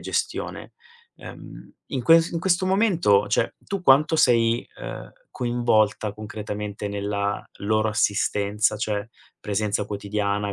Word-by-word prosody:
gestione. - - -3 0.4
Ehm, - - -11 0.2
in 130 -3 -3
ques 165 +4 +5
in 165 - -3
questo 185 0 +2
momento, 175 - +3
cioè, 105 - 0
tu 200 -2 -5
quanto 155 +2 +5
sei, 115 -4 +3
uhm, - - -7 0.2
coinvolta 110 -4 +1
concretamente 105 -1 -6
nella 100 0 -2 0.2
loro 110 +1 +1
assistenza? 105 +1 +1
Cioè, 105 0 -2 0.3
presenza 105 0 -1
quotidiana, 100 0 -2
105 Hz, 115 wpm, -24 LUFS, 105-125 Hz, 0.4 s, ques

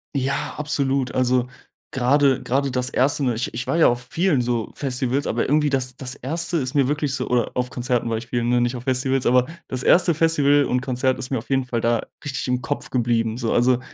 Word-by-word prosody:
Ja, 140 +1 -1
absolut. 140 -3 0
Also, 125 -1 +1 0.4
grade 135 +1 +2
grade 135 +2 0
das 125 0 -1
1., 140 +3 +1
ne? 125 -3 +1
Ich 115 - -3
ich 115 - -4
war - - 0
ja 165 - +6
auf 120 +1 -1
vielen, 170 -6 +1
so, 120 -2 -2
Festivals, 130 0 -1
aber 115 - 0
irgendwie 150 +1 +2
das 130 -2 -1
das 130 -1 -4
1. 165 +6 -2
ist 130 -3 -2
mir 140 -3 +3
wirklich 150 -1 -1
so 140 - -2
oder 120 -2 0
auf 125 0 -1
Konzerten 125 -2 -1
war 115 - -1
ich 115 +2 -7
vielen, 120 -1 -1
ne, 120 0 +3
nicht 120 +1 0
auf 125 - -7
Festivals. 130 0 0
Aber 125 0 +4 0.2
das 130 -1 -4
1. 175 -1 +4
Festival 145 -3 +3
und 125 0 0
Konzert 130 0 -1
ist 130 - -4
mir 130 - -1
auf 115 - -13
jeden 135 -1 +1
Fall 120 -2 -2
da 115 -1 +1 0.2
richtig 140 -2 -4
im 125 0 0
Kopf 145 - -4
geblieben. 115 -2 0
So, 115 -3 -1
also, 125 +1 +3
130 Hz, 230 wpm, -22 LUFS, 125-140 Hz, 0.4 s, ja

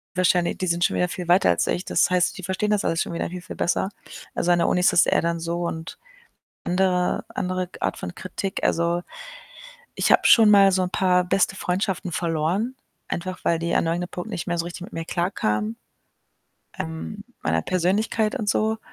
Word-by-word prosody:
wahrscheinlich 180 -1 +2
die 185 - -2
sind 170 +1 +1
schon - - +2
wieder 180 - +2
viel 175 -1 -6
weiter 175 - +5
als 85 - +1
ich. 180 - -1
Das 175 - +2
heißt, 180 +1 +1
die 185 - -8
verstehen 190 +3 -1
das 210 - +2
alles 165 - 0
schon - - -3
wieder 170 - -2
viel, 180 0 -7
viel 175 - -9
besser. 190 +2 0 0.5
Also, 175 - +1
an 175 - +4
der - - +2
Uni 180 - +2
ist - - +5
das 175 - +5
eher - - +2
dann 170 0 -1
so 170 +1 -3
und 160 +1 -6 0.7
andere 180 0 +1
andere 185 0 -2
g - - -14
Art - - -1
von 90 - -6
Kritik, 190 +1 -5
also, 170 +1 +1 0.9
ich - - +1
habe - - +6
schon 220 -3 +7
mal 195 -1 +7
so 185 0 +2
'n 180 - -2
paar 180 -1 +2
beste 190 +1 +1
Freundschaften 185 0 -2
verloren, 170 +9 -1 0.3
einfach 185 +2 -4
weil 165 -1 +2
die 170 0 -1
an - - +2
irgendeinem 175 +2 -1
Punkt 180 +5 -6
nicht 185 -6 -5
mehr 175 0 -1
so 165 - 0
richtig 175 +1 -7
mit - - -11
mir 165 - -3
klarkamen, 115 - -1 1.0
ähm, 80 0 -5 0.2
meiner 80 0 +1
Persönlichkeit 205 +4 0
und 210 - -3
so 220 +2 +1
180 Hz, 205 wpm, -24 LUFS, 170-190 Hz, 1.0 s, schon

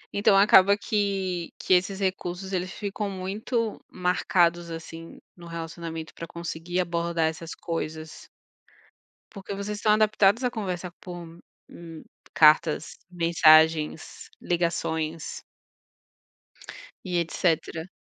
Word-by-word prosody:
Então, 200 -1 +4
acaba 200 0 +6
que 195 -5 -2
que - - +1
esses 190 +2 +2
recursos 190 0 -3
eles 180 0 -2
ficam 205 0 -4
muito 210 +4 -3
marcados, 175 -1 +1
assim, 165 0 -9 0.2
no 175 -1 -12
relacionamento, 165 -1 -6
para 165 - -8
conseguir 170 +1 -4
abordar 170 -1 0
essas 160 +1 -6
coisas. 160 -2 -6 1.0
Porque 195 -1 -7
vocês 205 +1 -4
estão 210 0 +3
adaptados 215 +1 +3
à 250 - +1
conversar 180 -5 -4
por, 180 -2 -8 0.5
hum, 165 -2 -11 0.3
cartas, 155 0 +4
mensagens, 160 -2 +3
ligações 165 -2 -2 1.6
e 180 -1 0
etcétera. 165 0 -1
175 Hz, 105 wpm, -26 LUFS, 165-195 Hz, 1.6 s, acaba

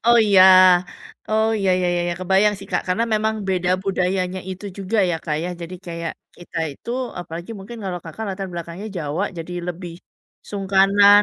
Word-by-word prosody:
Oh 235 0 +7
iya 195 -3 +7 0.9
Oh 220 +1 +2
iya 195 -2 +1
ya - - +2
ya - - +1
ya, 175 - -1
kebayang 190 +3 +3
sih, 195 - -10
Kak, - - +1
karena 185 +6 +1
memang 220 +1 +1
beda 180 -1 +1
budayanya 185 -1 -1
itu 185 +2 -7
juga 200 +3 -1
ya, 170 - 0
Kak, 150 -2 -1
ya. - - -2
Jadi 170 +2 -6
kayak 170 -1 -4 0.2
kita 175 -1 -7
itu, 185 - -9 0.3
apalagi 170 +3 -7
mungkin 210 +5 -9
kalau 180 -2 -3
Kakak 165 +7 -6
latar 195 0 -4
belakangnya 170 +4 -6
Jawa, 160 +3 -2
jadi 165 +2 -6 0.2
lebih, 175 0 -6 0.6
sungkanan 200 +1 +5
185 Hz, 175 wpm, -21 LUFS, 175-200 Hz, 0.9 s, Oh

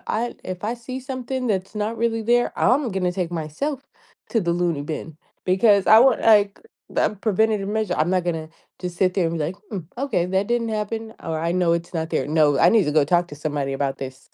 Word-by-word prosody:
I 235 +3 -2
if 185 0 -6
I 230 +3 -1
see 255 +2 -7
something 260 -1 -4
that's 195 -1 -2
not 215 +2 -2
really 225 -1 0
there, 240 +2 +2
I'm 250 +2 +3
gonna 185 -2 0
take 175 -2 -3
myself 170 - -3 0.5
to 225 - +2
the 170 -2 0
loony 170 -4 0
bin, 155 +1 -6 0.3
because 200 +1 +4
I 220 - +8
want, 265 +3 +5
like, 205 -2 +4 0.4
a - - +3
preventative 215 0 +1
measure. 215 -4 -1
I'm 155 +4 +1
not 185 -2 +1
gonna 160 -2 -3 0.3
just 180 -1 -5
sit 185 -1 +2
there 180 -4 +2
and 165 0 -3
be, 150 - 0
like, 175 +5 -4
hmm, 200 - -3 0.2
okay, 250 -10 0
that 190 +2 0
didn't 240 -1 0
happen, 220 +1 -3
or 160 -2 -3
I 170 +1 0
know 180 -2 +2
it's 170 +1 -3
not 160 0 -2
there. 130 - 0
No, 150 -2 +3
I - - +6
need 220 -5 +4
to 150 - -1
go 150 -2 +4
talk 175 +3 +2
to 145 - -9
somebody 145 -2 -3
about 135 0 -1
this. 130 0 -8
185 Hz, 225 wpm, -23 LUFS, 165-225 Hz, 0.5 s, I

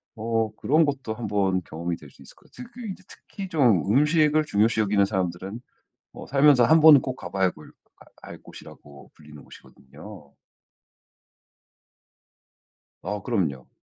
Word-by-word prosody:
어 115 -1 -2
그런 155 +7 +2
것도 135 -6 -4
1 110 0 -6
번 95 -2 0
경험이 85 +2 -5
될 - - -15
수 - - -22
있을 - - -16
것 - - -26
같아요. 250 - -11
그 250 - -11
그 230 - -7
이제 190 -1 -8
특히 195 -2 -10
좀 120 - +2
음식을 150 +3 +2
중요시 110 -3 +1
여기는 100 -1 +2
사람들은 95 +2 -4 0.5
어 - - -11
살면서 140 -2 +4
1 160 +1 +4
번은 155 -3 +8
꼭 130 -1 -6
가봐야 95 -2 -2
골 75 - -16 0.3
가 - - -20
갈 - - -12
곳이라고 70 -1 -15
불리는 75 -1 -15
곳이거든요. 75 +3 -15 2.7
아 105 +3 -5
그럼요. 80 - -3
110 Hz, 285 characters per minute, -24 LUFS, 90-140 Hz, 2.7 s, 번은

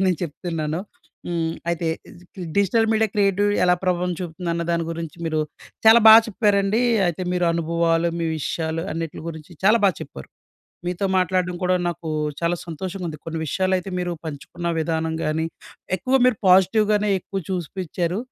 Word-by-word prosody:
నేను 180 -3 +2
చెప్తున్నాను 165 0 -3 0.5
హ్మ్. 165 -2 -1 0.2
అయితే 170 0 -2 0.2
ఇజ్ 180 - -16 0.3
డిజిటల్ 225 +3 +3
మీడియా 220 0 +2
క్రియేటివిటీ 205 0 +2
ఎలా 180 0 +5
ప్రభావం 180 -1 0
చూపుతుందన్న 170 0 -3
దాని 170 -1 0
గురించి 165 -1 -6
మీరు 155 -1 0 0.5
చాలా 225 +1 +9
బా 220 - +12
చెప్పారండి. 205 0 +2 0.3
అయితే 175 +2 -3
మీరు 180 -1 +1
అనుభవాలు, 165 0 +1
మీ 165 - -1
విషయాలు, 160 +2 -2
అన్నిటి 165 -1 -4
గురించి 160 +1 -9
చాలా 215 +4 +6
బాగా 185 -5 +3
చెప్పారు. 70 - -10 0.6
మీతో 180 +2 -1
మాట్లాడడం 180 -1 +1
కూడా 180 0 +2
నాకు 170 -1 -5 0.3
చాలా 170 +1 +1
సంతోషంగా 180 +2 -5
ఉంది. 155 -2 -7
కొన్ని 165 0 -3
విషయాలు 185 +5 0
అయితే, 185 +2 -7
మీరు 175 -1 -2
పంచుకున్న 170 +3 -5
విధానం 160 0 -1
గాని, 160 +1 0 0.5
ఎక్కువ 255 +9 +1
మీరు 255 -4 +3
పాజిటివ్ 190 +4 +5
గానే 210 0 +2
ఎక్కువ 195 +2 -5
చూసిపిచ్చారు. 180 0 -2
175 Hz, 155 wpm, -23 LUFS, 165-190 Hz, 0.6 s, బా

